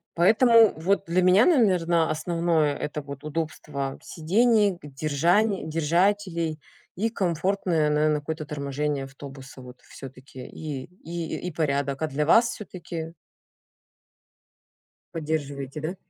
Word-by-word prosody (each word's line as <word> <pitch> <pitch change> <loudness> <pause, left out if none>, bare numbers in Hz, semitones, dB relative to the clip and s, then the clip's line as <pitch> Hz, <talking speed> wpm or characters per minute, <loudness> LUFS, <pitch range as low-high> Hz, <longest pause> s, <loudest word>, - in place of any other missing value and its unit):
Поэтому 225 +5 +5
вот 195 +5 +1
для 180 +2 +2
меня, 185 +5 +6
наверно, 180 - +3
основное 165 -2 0
это 150 0 -4
вот 140 0 -9
удобство 150 -3 -4
сидений, 205 +5 +2
г 175 - -10
держаней 155 +9 +1
держателей 170 0 0 0.4
и 220 +5 0
комфортное, 180 -4 0
наверно, 150 0 +2
какое-то 155 +1 -5
торможение 140 -1 -3
автобуса 135 -1 -11
вот 125 0 -13
всё-таки 130 -1 -11
и 145 -4 -6
и 170 -2 -6
и - - -3
порядок. 140 -3 -1
А 160 - +1
для 150 +1 -1
вас 230 +9 +5
всё-таки 170 -5 -7 2.0
Поддерживаете, 145 -3 -4
да? 165 +5 -4
160 Hz, 115 wpm, -25 LUFS, 145-180 Hz, 2.0 s, меня